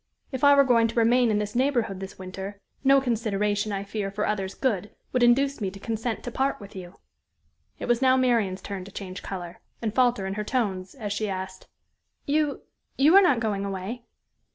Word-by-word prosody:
if 260 -1 -5
I 285 0 +8
were 280 - +7
going 235 -3 +4
to 230 - -7
remain 240 +1 +4
in 210 - +2
this 210 0 -2
neighborhood 240 -7 +1
this 195 0 -8
winter, 190 +2 -7 0.2
no 275 0 +6
consideration, 210 -4 0
I 195 -1 -2
fear, 200 0 -3
for 205 +2 -2
others' 195 -2 -2
good, 210 -6 -1 0.2
would 250 - +2
induce 270 +2 +3
me 195 - 0
to 195 +1 -11
consent 225 +2 -3
to 245 - -5
part 270 +3 0
with 200 +1 -12
you." 180 -1 -9 0.8
It - - -5
was 240 0 +2
now 260 0 +5
Marian's 225 -7 +1
turn 195 -2 -5
to 200 - -11
change 185 -1 -7
color, 180 -3 -7 0.2
and 220 -3 -2
falter 245 -5 +2
in 190 - -3
her 210 +1 -3
tones, 200 -5 -2
as 210 -6 -4
she 210 0 -2
asked: 190 0 -6 0.6
"You 295 0 0 0.3
you 300 +6 +5
are 395 - +10
not 285 -11 +4
going 205 -3 -1
away?" 200 +5 -5
215 Hz, 200 wpm, -26 LUFS, 195-250 Hz, 0.8 s, are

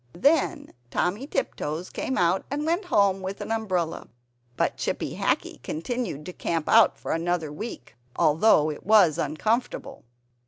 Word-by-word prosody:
Then 290 - +2 0.2
Timmy 205 - -1
Tiptoes 160 - -3
came 260 - -3
out, 175 +2 +2
and 290 +2 -2
went 345 +5 0
home 200 - +2
with 190 +1 -5
an - - -5
umbrella. 185 -7 -1 0.5
But - - +1
Chippy - - -3
Hackee - - -1
continued 170 - -4
to 180 - -7
camp 165 -3 -2
out 225 -1 +5
for - - -5
another 165 -2 -1
week, 210 - -8 0.2
although 155 -1 +4
it 150 - -9
was 185 -6 +5
uncomfortable. 220 +10 -2
190 Hz, 145 wpm, -26 LUFS, 165-235 Hz, 0.5 s, out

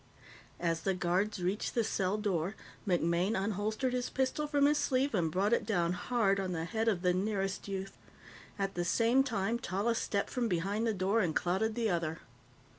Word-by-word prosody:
As 165 -1 0
the 190 +2 0
guards 185 +2 0
reached 190 +4 -1
the 235 - +3
cell 195 -2 0
door, 195 -2 -1 0.3
MacMaine 175 +2 +2
unholstered 215 +5 -1
his 250 -1 -1
pistol 265 +3 -1
from 290 -1 +3
his 295 +1 +3
sleeve 275 -1 +1
and 170 -6 +1
brought 200 +6 +1
it - - +2
down 175 -5 +1
hard 200 0 +1
on 185 -2 -2
the 165 -1 -2
head 220 +6 -2
of 195 -5 +1
the 180 -1 +3
nearest 195 0 -1
youth. 195 -1 -4 0.6
At 195 -1 -1
the 175 - -1
same 230 +8 +3
time, 230 -2 -1
Tallis 225 +2 0
stepped 200 -1 -1
from 245 -2 0
behind 200 +4 0
the 225 - +1
door 195 +4 +1
and 170 -7 0
clouted 195 +5 0
the 230 -4 +1
other. 165 -2 -1
200 Hz, 190 wpm, -32 LUFS, 180-230 Hz, 0.6 s, the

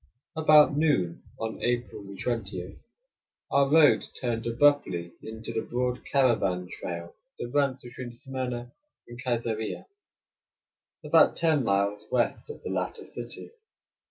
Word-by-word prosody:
About 155 -2 +6
noon 145 - +1 0.2
on 110 0 -4
April 120 -3 -1
20, 100 -6 -4 0.7
our 140 0 +4
road 155 -2 +6 0.2
turned 115 -2 -2
abruptly 115 -10 +2
into 110 0 -7
the 110 - 0
broad 125 +1 -2
caravan 110 -10 +2
trail 85 -1 -6 0.2
that 120 - -5
runs 140 -2 +1
between 120 0 -8
Smyrna 125 -1 -5 0.4
and 120 +1 -9
Kaisarieh, 115 -3 -2 1.2
about - - +5
ten 160 -5 +3
miles 100 0 0
west 120 - 0
of 450 - -9
the - - -4
latter - - -3
city. - - -9
120 Hz, 120 wpm, -28 LUFS, 105-135 Hz, 1.2 s, About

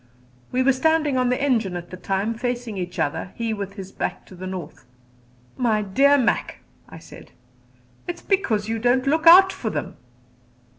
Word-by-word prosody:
We 255 +1 +1
were 270 +1 +4
standing 305 +1 +1
on 255 -1 +1
the 250 - 0
engine 230 -10 0
at 175 0 -9
the - - -6
time, 195 +4 -2
facing 240 -1 -4
each 180 -1 -5
other, 145 +5 -2
he 230 -1 -2
with 200 -2 -5
his 195 -2 -9
back - - -4
to 185 - -14
the 185 +1 -7
north. 180 -4 -7 0.7
"My 220 -4 +1
dear 275 +9 +4
Mac," 250 -4 -1 0.3
I - - -11
said, - - -14 0.8
"it 350 - -3
is - - -17
because 235 - 0
you 225 0 -2
don't 245 +3 +2
look 315 +4 +1
out 380 +3 +9
for 220 - -4
them." - - -5
230 Hz, 185 wpm, -23 LUFS, 195-270 Hz, 0.8 s, out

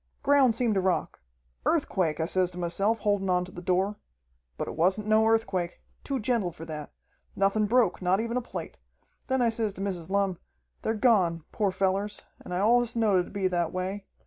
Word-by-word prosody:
"Ground 275 -5 +4
seemed 235 -2 +1
to 195 - +1
rock. 185 -1 -1 0.4
Earthquake, 165 -5 +1
I 160 - +1
says 185 +1 +1
to 180 - -11
myself, 195 +6 0
holdin' 205 -2 +1
on 180 0 +2
to 180 - -11
the 175 - -8
door. 190 +3 0 0.6
But - - -3
it - - -5
wasn't 185 +6 +2
no 215 +1 +4
earthquake. 195 -6 0 0.2
Too 275 -2 -2
gentle 215 -5 0
for 165 0 -10
that. 155 -2 -7 0.4
Nothin' 200 +2 +2
broke, 230 -5 +2
not 185 +2 +2
even 230 +1 -2
a 250 - +1
plate. 235 - -7 0.5
Then 260 -1 +1
I 235 - +4
says 225 -2 -2
to 190 - -8
Mrs. 185 -4 -3
Lumm, 195 -3 0 0.4
'They're 220 - -1
gone, 190 -9 +3
poor 205 -3 +1
fellers, 195 +2 -1 0.2
and - - -11
I 180 - -1
allus 235 +4 +3
knowed 215 -5 +3
it - - +1
would - - -14
be 195 -2 +1
that 175 -2 0
way. 190 +2 -4
195 Hz, 200 wpm, -28 LUFS, 180-220 Hz, 0.6 s, Ground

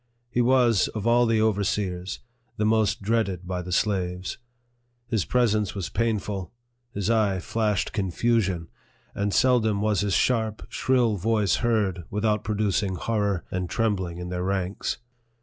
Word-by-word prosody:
He 125 - +2
was, 120 -4 +4
of 110 -1 -3
all 120 +1 +4
the 115 -1 +2
overseers, 100 -3 -1 0.4
the 105 - +1
most 110 -2 +2
dreaded 100 -4 0
by 90 -1 -2
the 90 0 -7
slaves. 90 -1 -1 0.7
His 110 -5 -1
presence 110 -5 +1
was 95 -3 -3
painful; 105 -5 -2 0.4
his 100 +1 -1
eye 105 -4 +2
flashed 105 0 -1
confusion; 95 -2 0 0.5
and 100 0 -1
seldom 110 -4 +3
was 105 -2 +1
his 100 -2 +1
sharp, 110 -3 +1
shrill 120 -5 +1
voice 105 0 +1
heard, 105 -7 0
without 105 0 0
producing 105 -2 0
horror 100 -3 -1
and 90 -1 -2
trem 115 -3 +1
bling 90 -3 -5
in 90 0 -6
their 90 0 -3
ranks. 95 0 -2
105 Hz, 145 wpm, -25 LUFS, 95-115 Hz, 0.7 s, was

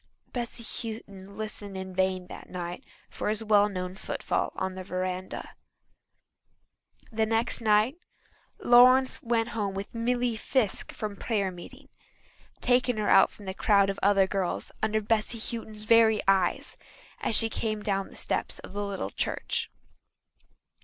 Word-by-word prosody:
Bessy 240 -1 -5
Houghton 200 -4 -6
listened 210 -2 -5
in 190 0 -6
vain 185 0 0
that - - -11
night 180 +5 -5 0.2
for - - -4
his 215 +1 0
well 210 -1 +4
known 185 -2 -4
footfall 190 - -2
on 190 - -2
the 185 0 -7
verandah. 185 0 -4 1.6
The 220 0 0
next 225 +2 +2
night 215 +6 +3 0.6
Lawrence 255 +2 +5
went 230 0 0
home 205 -4 -2
with 195 +1 -6
Milly 240 0 0
Fiske 220 -1 -1
from 210 -2 -5
prayer 200 -4 -1
meeting, 255 +11 -12 0.7
taking 245 -1 +2
her 210 -1 0
out - - +7
from 205 - -14
a 190 - -3
crowd 200 0 +3
of 195 - -8
other 195 -1 +4
girls 190 -2 -2
under 220 0 +1
Bessy 220 +2 0
Houghton's 220 -1 -5
very 220 -1 +5
eyes 190 -2 +1 0.4
as 220 - +5
she 225 - +6
came 215 -1 -3
down 195 -1 -1
the - - -15
steps - - -2
of - - -11
the 205 0 -2
little 195 - -4
church. - - -2
210 Hz, 145 wpm, -28 LUFS, 195-230 Hz, 1.6 s, out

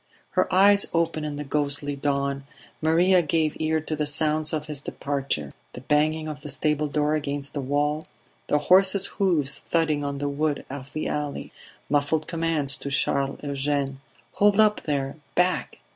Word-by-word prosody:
Her - - +1
eyes 200 +2 +6
open 165 -2 0
in 150 -1 -4
the 145 - -4
ghostly 145 0 0
dawn, 140 -1 -1 0.4
Maria 175 +4 +4
gave 155 -1 0
ear 160 0 +1
to 155 +1 -3
the 150 -1 -1
sounds 155 +1 +1
of 155 -1 -2
his 150 -3 -4
departure: 140 - -3 0.2
the 125 - -9
banging 155 +3 +1
of 150 -1 -6
the 150 - -7
stable 150 +2 0
door 150 +1 0
against 145 -2 -3
the 145 - -3
wall; 145 +3 -1 0.4
the 150 - +2
horse's 190 +5 +4
hoofs 170 -9 +1
thudding 155 -3 0
on 140 0 -3
the 145 +1 -2
wood 145 +1 -1
of 140 0 -8
the 155 - -2
alley; 150 -1 -4 0.4
muffled 145 +2 +1
commands 165 -4 0
to 140 - -6
Charles 140 0 -1
Eugene: 140 -1 -2 0.3
"Hold 205 0 +3
up, 215 -1 +4
there! 140 -1 -2 0.2
Back 180 +1 +1
150 Hz, 165 wpm, -25 LUFS, 140-160 Hz, 0.4 s, eyes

